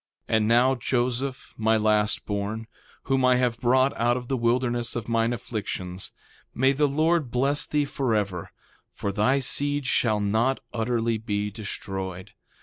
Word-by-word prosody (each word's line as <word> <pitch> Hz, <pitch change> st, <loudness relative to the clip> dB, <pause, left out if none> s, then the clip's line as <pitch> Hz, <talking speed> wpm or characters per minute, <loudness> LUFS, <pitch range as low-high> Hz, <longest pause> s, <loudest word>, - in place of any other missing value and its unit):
3:3 -, -, +1 dB
And 110 Hz, -1 st, +2 dB
now, 120 Hz, +3 st, +4 dB
Joseph, 125 Hz, +1 st, -2 dB
my 110 Hz, 0 st, +3 dB
last 105 Hz, -1 st, +1 dB
born, 105 Hz, +2 st, -3 dB, 0.4 s
whom 135 Hz, -1 st, +1 dB
I 125 Hz, 0 st, +5 dB
have 125 Hz, -2 st, 0 dB
brought 130 Hz, +2 st, +3 dB
out 120 Hz, +1 st, +2 dB
of 125 Hz, -1 st, -7 dB
the 135 Hz, -, +1 dB
wilderness 120 Hz, 0 st, 0 dB
of 115 Hz, -3 st, -4 dB
mine 115 Hz, 0 st, +1 dB
afflictions, 95 Hz, -5 st, -5 dB, 0.4 s
may 130 Hz, +2 st, +4 dB
the 145 Hz, +2 st, +2 dB
Lord 155 Hz, 0 st, +1 dB
bless 135 Hz, +4 st, +1 dB
thee 150 Hz, -1 st, +1 dB
forever, 105 Hz, -10 st, -1 dB, 0.5 s
for 100 Hz, -, -2 dB
thy 110 Hz, +7 st, +2 dB
seed 145 Hz, +1 st, +1 dB
shall 110 Hz, -4 st, +2 dB
not 110 Hz, +6 st, +1 dB
utterly 115 Hz, -1 st, 0 dB
be 105 Hz, -2 st, -2 dB
destroyed. 95 Hz, -3 st, -6 dB
120 Hz, 150 wpm, -25 LUFS, 105-130 Hz, 0.5 s, I